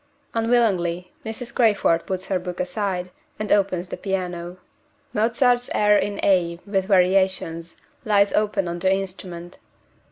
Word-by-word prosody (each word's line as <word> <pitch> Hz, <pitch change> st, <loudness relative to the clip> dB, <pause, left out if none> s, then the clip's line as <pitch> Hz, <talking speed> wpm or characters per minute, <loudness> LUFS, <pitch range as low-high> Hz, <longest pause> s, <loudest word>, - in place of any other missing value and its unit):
Unwillingly, 195 Hz, -7 st, +1 dB
Mrs. 225 Hz, +2 st, -6 dB
Crayford 205 Hz, -8 st, +2 dB
puts 185 Hz, 0 st, -3 dB
her 190 Hz, -2 st, -1 dB
book 180 Hz, 0 st, -6 dB
aside, 180 Hz, -1 st, -2 dB, 0.3 s
and 215 Hz, -, -4 dB
opens 185 Hz, -3 st, +1 dB
the -, -, -5 dB
piano 180 Hz, -2 st, -4 dB, 0.6 s
Mozart's 240 Hz, +3 st, +2 dB
"Air 210 Hz, 0 st, +4 dB
in 205 Hz, 0 st, 0 dB
A, 170 Hz, -3 st, +2 dB
with 195 Hz, -2 st, 0 dB
Variations," 185 Hz, -3 st, +1 dB, 0.3 s
lies 200 Hz, -2 st, +3 dB
open 205 Hz, -3 st, +1 dB
on 170 Hz, 0 st, -4 dB
the 190 Hz, +1 st, +2 dB
instrument. 185 Hz, -2 st, -5 dB
190 Hz, 130 wpm, -23 LUFS, 180-210 Hz, 0.6 s, Air